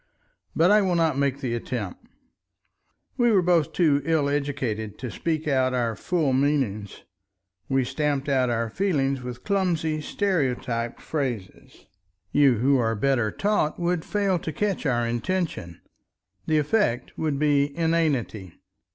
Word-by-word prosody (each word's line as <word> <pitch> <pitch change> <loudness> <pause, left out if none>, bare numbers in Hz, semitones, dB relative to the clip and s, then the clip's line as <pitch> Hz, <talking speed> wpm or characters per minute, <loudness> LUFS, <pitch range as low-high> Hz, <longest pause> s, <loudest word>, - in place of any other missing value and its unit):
But 175 +4 +4
I 210 0 +6
will 185 -3 +1
not 165 -4 +2
make 140 0 0
the 125 -4 -2
attempt. 115 -5 -5 1.1
We 240 -1 +3
were 195 -4 +4
both 170 -4 +2
too 150 -5 +2
ill 155 -2 +1
educated 130 -8 -2
to 125 -3 -6
speak 160 -2 -2
our 130 -4 +1
full 155 0 0
meanings, 130 -8 -1 0.7
we 135 -1 +2
stamped 140 +2 -1
out 130 -3 +2
our 115 -1 0
feelings 140 - 0
with 125 -1 -7
clumsy 170 -6 0
stereotyped 130 - -1
phrases; 125 -11 -5 0.5
you 140 -4 +4
who 130 +4 +2
are 115 -1 +1
better 120 -1 +1
taught 200 -7 0
would 175 -1 0
fail 200 -3 0
to 160 - -5
catch 195 -2 -1
our 120 -2 +1
intention. 120 - -3 0.7
The 155 - +2
effect 150 - 0
would 155 -3 -1
be 145 -1 +3
inanity. 150 - 0
140 Hz, 135 wpm, -25 LUFS, 125-165 Hz, 1.1 s, I